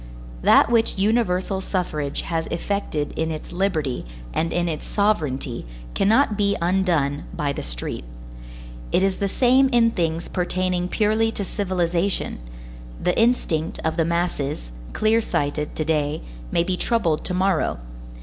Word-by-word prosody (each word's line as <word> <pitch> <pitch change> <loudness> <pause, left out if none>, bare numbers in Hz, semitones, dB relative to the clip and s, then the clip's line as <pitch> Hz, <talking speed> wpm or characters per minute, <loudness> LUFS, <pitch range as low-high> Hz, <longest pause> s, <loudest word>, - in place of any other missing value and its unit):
That - - +6
which 225 -3 +2
universal 195 -2 +1
suffrage 155 -7 -2
has 165 -1 -2
effected 170 -4 -2
in 160 0 -1
its 155 -1 -6
liberty 175 -8 -1 0.3
and 165 +1 0
in 175 0 0
its 155 -3 -3
sovereignty 150 - 0 0.3
cannot 220 +3 +3
be 200 -1 +1
undone 170 -6 +1
by 145 -1 -1
the - - -4
street. - - -4 0.9
It 185 - +3
is 195 -1 +1
the 200 - -1
same 260 +4 +4
in 235 -2 +4
things 165 -3 -1
pertaining 180 0 0
purely 220 +2 +2
to 200 - -2
civilization; 185 - -1 0.6
the 180 - +1
instinct 200 -9 +1
of 160 0 +1
the 165 - +2
masses, 155 - -2 0.2
clear 220 +1 +3
sighted 150 -5 -2
to 155 - -1
day, 150 -1 0 0.3
may 170 - +3
be 180 +1 -1
troubled 175 -11 +1
to 180 - -1
morrow. 185 - +1
180 Hz, 140 wpm, -23 LUFS, 155-200 Hz, 0.9 s, That